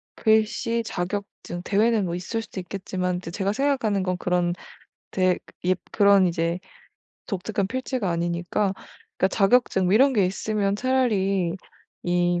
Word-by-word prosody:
글씨 225 +1 +2
자격증 180 -2 -5
대회는 210 +1 +2
뭐 170 - -3
있을 225 +6 -3
수도 195 - -8
있겠지만 180 -1 -3
이제 175 -2 -7
제가 195 +2 -1
생각하는 235 -8 +1
건 185 -1 0
그런 180 -1 0 0.6
대 185 -1 +2 0.3
입 185 0 +2
그런 200 -2 +5
이제 170 +1 -1 0.7
독특한 200 0 -2
필체가 255 -5 -2
아니니까. 175 +4 -1 0.4
그러니까 190 - +2
자격증 195 -1 +3
뭐 180 - +3
이런 270 +4 +5
게 205 -5 +3
있으면 200 +1 -1
차라리 200 -8 +1 0.5
이 175 0 +1
195 Hz, 300 characters per minute, -24 LUFS, 180-220 Hz, 0.7 s, 그런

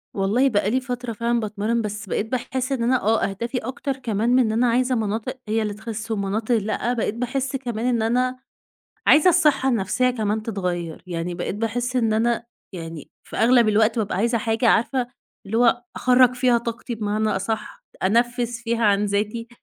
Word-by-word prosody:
والله 210 +8 +2
بقى 205 -4 +1
لي 255 +4 +1
فترة 245 -2 -4
فعلًا 235 +2 0
باتمرّن، 215 +2 -1
بس 210 0 -5
بقيت 205 - -1
باحس 255 +1 -2
إن 260 -4 0
أنا، 250 +1 +2
آه 220 +2 +2
أهدافي 235 +6 -4
أكتر 265 +3 -4
كمان 230 -3 -1
من 250 +1 +4
إن 230 -4 +2
أنا 235 +3 +2
عايزة 250 +2 +2
مناطق 225 +3 -2
هي 220 +1 +1
اللي 210 -1 -2
تخِس 220 +1 -6
ومناطق 215 +3 0
لأ، 220 +3 -1
بقيت 225 -3 -1
باحس 255 +3 -2
كمان 240 -4 -3
إن 240 -2 +1
أنا 250 +3 0 0.7
عايزة 310 +5 +7
الصحّة 300 -6 +3
النفسيّة 245 +2 +1
كمان 215 -3 -1
تتغيّر، 180 -6 -3
يعني 175 0 -3
بقيت 175 +2 -3
باحس 240 +4 -2
إن 225 -3 +2
أنا 235 +2 +1 0.3
يعني 165 -4 -8 0.2
في - - -7
أغلب 235 -1 +4
الوقت 220 +2 +3
بابقى 210 -3 -1
عايزة 235 +4 +1
حاجة 225 +2 +1
عارفة 240 +3 +2 0.4
اللي 210 +3 -2
هو 240 0 +3
أخرّج 250 0 +4
فيها 250 -1 +3
طاقتي 235 +1 -5
بمعنى 215 0 -1
أصح، 215 +2 -3
ت - - -21
أنفِّس 240 +3 +1
فيها 230 -1 0
عن 205 0 +3
ذاتي، 210 +3 -2
230 Hz, 185 wpm, -23 LUFS, 210-245 Hz, 0.7 s, عايزة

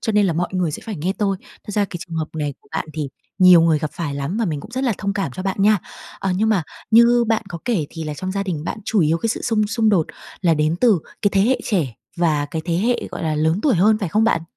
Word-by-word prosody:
cho 220 - -1
nên 205 -1 +4
là 175 - +1
mọi 175 +2 -1
người 180 -4 0
sẽ - - -6
phải 215 -4 -4
nghe 180 +6 -1
tôi. 195 -2 +1 0.3
Thật - - -7
ra 205 -1 +2
cái 185 - -6
trường 165 - -6
hợp 160 -1 -2
này 150 -2 -2
của - - -27
bạn - - -2
thì 150 -3 -3 0.3
nhiều 180 -2 +8
người 165 -2 +3
gặp 155 -1 -3
phải 150 -5 -4
lắm 140 +8 -3
mà 230 - +1
mình 155 -7 -2
cũng 215 - -11
rất 260 +2 -2
là 240 - +2
thông 200 -1 -1
cảm 195 -9 -2
cho 185 - -5
bạn 195 -1 -2
nha. 210 -1 +5 0.4
Ờ, 195 - -1
nhưng 220 +2 +2
mà 200 -6 +2 0.3
như 235 +1 +6
bạn 225 -1 +2
có 170 - -6
kể 195 -12 0
thì 165 -1 -6
là 150 -1 -4
trong 185 +4 -4
gia 200 0 -1
đình 165 -6 -3
bạn 210 - -4
chủ 215 -2 +1
yếu 160 +1 +2
cái 230 - -1
sự - - -2
xung 215 -3 +1
xung 220 +1 +1
đột 185 -7 +3 0.3
là 170 -3 +3
đến 155 +2 +1
từ 225 -8 +5 0.2
cái 205 - +3
thế 195 - +3
hệ 255 +6 +3
trẻ 160 - 0 0.2
và 160 -4 +1
cái 160 +2 -4
thế 170 -1 0
hệ, 235 +7 0
gọi - - -6
là, 155 -2 0
lớn 160 +5 +1
tuổi 280 -7 +3
hơn 210 +5 +4
phải 195 -6 -2
không 215 +6 +2
bạn? 165 -8 +2
185 Hz, 295 wpm, -21 LUFS, 160-215 Hz, 0.4 s, nhiều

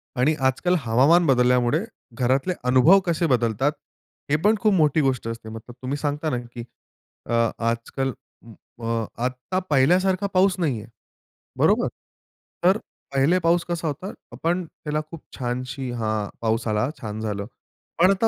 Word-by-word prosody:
आणि 145 +5 +2
आज-काल 175 +8 +1
हवामान 135 +8 +4
बदलल्यामुळे 125 +3 +3 0.4
घरातले 135 +8 +1
अनुभव 130 +10 +6
कसे 170 -1 +1
बदलतात, 125 +1 +2 0.6
हे 145 - +3
पण 210 +2 +5
खूप 215 -2 +3
मोठी 155 -3 +3
गोष्ट 130 -4 0
असते 115 -1 -6
मग 115 +1 -7
तुम्ही 130 +3 -5
सांगता 150 +1 -2
ना, 125 - -1
की 120 0 -8 0.6
अ, 120 - -3 0.3
आज-काल 115 +3 -1 0.7
अ, 115 0 -1 0.2
आता 130 +9 -2
पहिल्यासारखा 185 +8 +3
पाऊस 185 0 +4
नाहीये. 125 -10 -1 0.7
बरोबर? - - +3 0.8
तर 190 +4 +5 0.4
पहिले 140 +7 +3
पाऊस 170 0 +2
कसा 170 -1 -2
होता, 155 +7 -4 0.2
आपण 175 +2 -1
त्याला 155 -1 -4
खूप 165 - -8 0.2
छानशी 130 +1 -3
हां. 110 -3 -2
पाऊस 115 0 0
आला 110 +4 +1
छान 110 -1 -5
झालं. 105 -2 -3 0.5
पण 180 +3 +6
आता 195 +3 +2
135 Hz, 140 wpm, -24 LUFS, 120-170 Hz, 0.8 s, अनुभव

